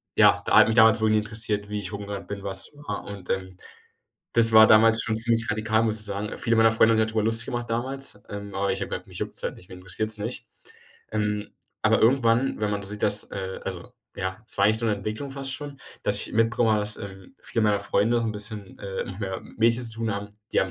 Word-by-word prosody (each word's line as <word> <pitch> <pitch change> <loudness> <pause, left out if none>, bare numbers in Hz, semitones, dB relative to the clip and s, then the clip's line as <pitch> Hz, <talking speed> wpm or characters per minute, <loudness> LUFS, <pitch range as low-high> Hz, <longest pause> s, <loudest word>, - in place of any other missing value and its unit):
ja, - - +5
da - - +5
hat - - +9
mich 110 - 0
damals 110 -1 +6
wohl 110 0 +2
nie 110 - +4
interessiert, 105 -1 -3
wie 105 0 -2
ich 100 0 -6
rumgerannt 100 -1 -6
bin, 100 -1 -6
was 95 -1 -5
war. 145 -9 -6
Und, 100 -3 -9
ähm, 95 -1 -2 0.8
das 115 -1 +6
war 110 0 +9
damals 110 +1 +6
schon 110 0 -1
ziemlich 115 0 0
radikal, 110 +1 +1
muss 110 -1 0
ich 105 - -5
sagen, 100 +1 -4
äh, - - -5
viele 115 0 +3
meiner 115 0 +5
Freunde 115 0 +5
haben - - +1
sich 110 - +3
da 110 - -6
drüber 110 -1 +1
Lust 115 0 +2
gemacht 120 -1 -4
damals, 130 -1 -4
ähm, 100 0 -7
aber 100 0 0
ich 95 - -3
habe - - -3
gesagt: - - -5
„Mich - - -9
juckt’s - - -4
halt - - -2
nicht, 90 - -16
mich 90 - -10
interessiert’s 110 +4 -1
nicht.“ 110 +4 -4 0.7
Ähm, 105 -1 -2 0.3
aber - - +3
irgendwann, 120 0 +3
wenn 105 - 0
man 100 0 -2
so 100 - -8
sieht, 105 0 -8
dass, 105 0 0
äh 95 -1 -5
also, - - -6 0.2
ja, 95 +4 -4
es - - -5
war 100 - +4
eigentlich 110 +1 +3
so 115 - -1
‘ne 105 - +2
Entwicklung 110 +7 -5
fast 135 0 -4
schon, 145 -2 -8 0.2
dass - - 0
ich - - -4
mitbekommen 115 +1 +2
habe, 105 -1 +3
dass, 105 0 -4
ähm, 95 +2 -10
viele 115 - -1
meiner 105 -1 +2
Freunde 115 +4 +1
so 115 - -1
'n 110 - -1
bisschen, 105 -2 -6
äh, 95 -1 -4 0.2
mehr 95 -2 -3
mit - - -16
Mädchen 115 +2 +3
zu 115 -1 -4
tun 115 -2 -1
haben, 100 0 -5 0.2
die - - +3
haben 95 - -1
110 Hz, 255 wpm, -25 LUFS, 100-115 Hz, 0.8 s, hat